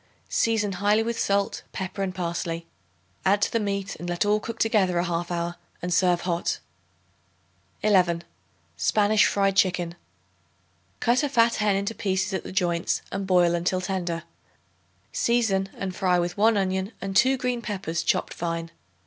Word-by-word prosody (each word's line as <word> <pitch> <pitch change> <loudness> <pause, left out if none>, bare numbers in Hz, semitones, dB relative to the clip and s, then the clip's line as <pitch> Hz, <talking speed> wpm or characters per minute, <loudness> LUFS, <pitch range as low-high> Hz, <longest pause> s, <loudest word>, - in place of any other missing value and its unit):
Season 220 -3 +1
highly 205 +4 +2
with 230 0 -3
salt, 200 0 0
pepper 190 +1 -4
and 190 -1 -2
parsley; 170 -1 -3 0.6
add 200 +2 +3
to 205 - +1
the 230 - +1
meat, 200 -1 -2
and 175 +2 -6
let 175 +3 0
all 210 +1 +3
cook 230 +1 -6
together 200 -6 +2
a 175 - +2
half 175 -1 -2
hour 175 0 -2 0.2
and 180 0 -2
serve 180 -1 +3
hot. 175 -1 -1 1.3
11. 180 -5 +3 0.5
Spanish 210 0 +3
Fried 195 -1 +1
Chicken. 180 -3 +2 1.1
Cut 240 +1 +3
a 290 - 0
fat 235 -3 +3
hen 210 -2 +2
into 200 +3 -1
pieces 190 -2 -1
at 190 - -1
the - - -7
joints 175 -2 0
and 195 0 -3
boil 175 -2 +4
until 175 +2 0
tender; 180 -3 -2 0.9
season 215 -5 +1
and 190 -2 -4
fry 180 -2 +2
with 175 0 -1
1 220 +1 +4
onion 190 +2 -1
and 195 0 -5
2 265 +4 +5
green 250 -1 -1
peppers 190 -7 -3
chopped - - 0
fine. 165 -1 -3
190 Hz, 160 wpm, -25 LUFS, 175-210 Hz, 1.3 s, 2